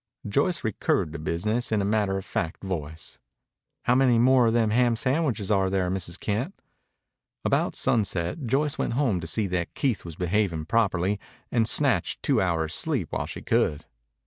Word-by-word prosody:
Joyce 155 - +1
recurred 95 -7 0
to 85 - -5
business 105 +10 -1
in 110 - +2
a 100 - 0
matter 100 -2 +1
of 95 - -6
fact 85 +2 -3
voice. 80 -4 -5 0.6
"How 120 - +3
many 125 -2 +4
more 125 0 +5
of 115 - +2
the 115 -2 +3
ham 120 +2 +3
sandwiches 130 - 0
are 95 -2 +3
there, 95 -2 0
Mrs. 90 -1 -4
Kent?" 120 - -2 0.9
About - - +1
sunset 105 - 0
Joyce 145 +5 0
went - - 0
home 120 -8 +1
to 80 - -6
see 110 +5 0
that 90 -3 -2
Keith 130 -6 0
was 85 -2 -8
behaving 90 -3 0
properly 100 -1 +1 0.3
and 115 -2 +2
snatched - - +1
two - - +2
hours' 80 -3 0
sleep 135 - -1
while - - -2
she - - -8
could. 75 - +1
105 Hz, 170 wpm, -26 LUFS, 90-120 Hz, 0.9 s, more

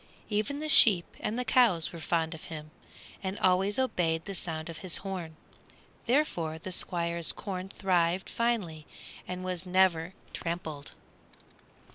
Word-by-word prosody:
Even 215 +6 -1
the 310 - -3
sheep 200 - +9
and 220 - -3
the 250 - -2
cows 220 -13 +3
were 170 - -8
fond 165 0 -1
of 160 - -10
him, 155 -1 -9 0.5
and 190 +1 -4
always 190 +2 +2
obeyed 170 -11 0
the 200 - -6
sound 160 -3 -4
of 165 -1 -8
his 185 -3 0
horn; 180 -5 -5 0.7
therefore 180 - 0
the 180 +3 -8
Squire's 170 -2 +2
corn 190 -2 -6
thrived 180 -2 0
finely, 200 -11 -2 0.4
and 180 0 -5
was 180 -1 -3
never 180 -1 +2 0.2
trampled. 160 -4 -5
180 Hz, 140 wpm, -29 LUFS, 165-195 Hz, 0.7 s, sheep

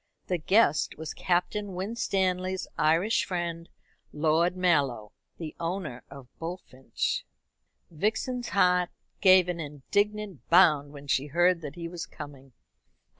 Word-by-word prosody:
The 180 -2 -1
guest 175 -2 +3
was 160 0 -6
Captain 185 +2 -1
Winstanley's 190 -2 -1
Irish 165 +8 +2
friend, 170 -2 -4 0.4
Lord 160 +4 +1
Mallow, 140 - +1 0.3
the 160 -3 -7
owner 165 -7 -4
of 135 -2 -11
Bullfinch. 165 -6 -3 0.7
Vixen's 220 +8 -1
heart 180 -1 +3 0.3
gave 185 -2 +7
an 175 -1 -3
indignant 200 +6 -2
bound 155 -5 +5
when 145 -1 -11
she 140 0 0
heard 175 +3 +3
that 150 -1 -7
he 170 -1 -5
was 170 0 -6
coming. 135 -3 -11
170 Hz, 120 wpm, -28 LUFS, 150-185 Hz, 0.7 s, gave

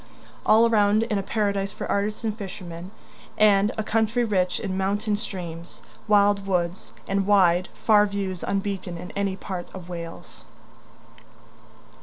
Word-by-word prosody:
All 225 +2 +6
around 215 -1 +3
is 230 -2 -2
a 200 - +1
paradise 200 -1 -1
for - - -6
artists 210 +3 -1
and 215 -2 -1
fishermen, 180 -4 -8 0.5
and 205 -1 +4
a 220 - -1
country 220 +2 +1
rich 185 -5 0
in 190 -2 -3
mountain 205 +3 0
streams, 170 -5 -7 0.2
wild 205 -1 +3
woods, 180 -1 -1 0.2
and 195 0 0
wide, 185 -3 +4 0.2
far 210 -2 +6
views 195 -3 -3
unbeaten 195 -3 -2
in 180 +2 -8
any 200 -1 -1
part 185 -2 -6
of 180 -1 -9
Wales. 170 0 -8
200 Hz, 140 wpm, -25 LUFS, 185-210 Hz, 0.5 s, All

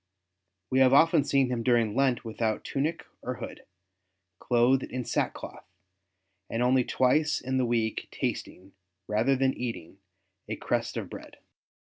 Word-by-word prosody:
We 130 - +3
have 130 0 +5
often 160 +1 +5
seen 135 -2 +2
him 120 -2 -1
during 115 -3 +2
Lent 130 -3 +1
without 110 -1 -2
tunic 150 +4 -2 0.2
or - - -4
hood, - - -9 0.7
clothed 125 +2 +3
in 125 -1 -5
sackcloth, - - -3 0.8
and 115 +2 -1
only 130 +1 +4
twice 150 +6 +2
in 130 +1 -1
the 125 - +1
week 115 -2 -1
tasting, 95 +2 -5 0.3
rather 110 +6 +2
than 135 0 +2
eating, 100 -7 -6 0.5
a - - -2
crust - - -2
of - - -4
bread." - - -11
125 Hz, 140 wpm, -28 LUFS, 115-135 Hz, 0.8 s, have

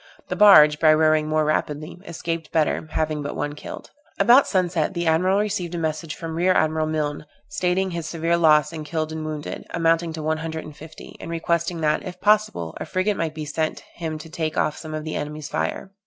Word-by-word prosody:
The - - -2
barge, 150 -8 +7
by 155 -1 +6
rowing 155 0 +3
more 155 0 +1
rapidly, 155 +1 -2
escaped 165 -1 -4
better, 160 0 0
having 155 -1 -1
but 145 0 -5
one 145 - -3
killed. 150 - -9 0.3
About 250 +4 +6
sunset 180 -3 0
the 170 0 -1
admiral 180 +4 +3
received 195 -5 -2
a - - -2
message 160 -1 -3
from 165 -1 -6
rear 180 +3 +2
admiral 155 -1 +1
Milne, 150 -1 -2 0.2
stating 185 +1 0
his 170 -2 -4
severe 165 +1 0
loss 155 -2 +4
in 155 -1 -5
killed 155 0 -3
and 160 0 -5
wounded, 155 -1 -6
amounting 165 0 +1
to 160 -1 -6
one 155 +1 0
hundred 160 0 -5
and 150 - -10
fifty, 155 +1 -12
and - - -8
requesting 170 0 -1
that, 150 -1 +1
if 180 -1 -8
possible, 210 - +1
a - - -4
frigate 190 +3 0
might 160 -3 -3
be 155 -1 -5
sent 155 +1 -2 0.2
him 160 -2 -4
to 155 +1 -10
take 160 -1 -3
off 150 - +1
some 155 -1 -7
of 155 - -4
the 155 - -4
enemy's 150 0 -5
fire. 190 - -3
160 Hz, 210 wpm, -23 LUFS, 155-170 Hz, 0.3 s, barge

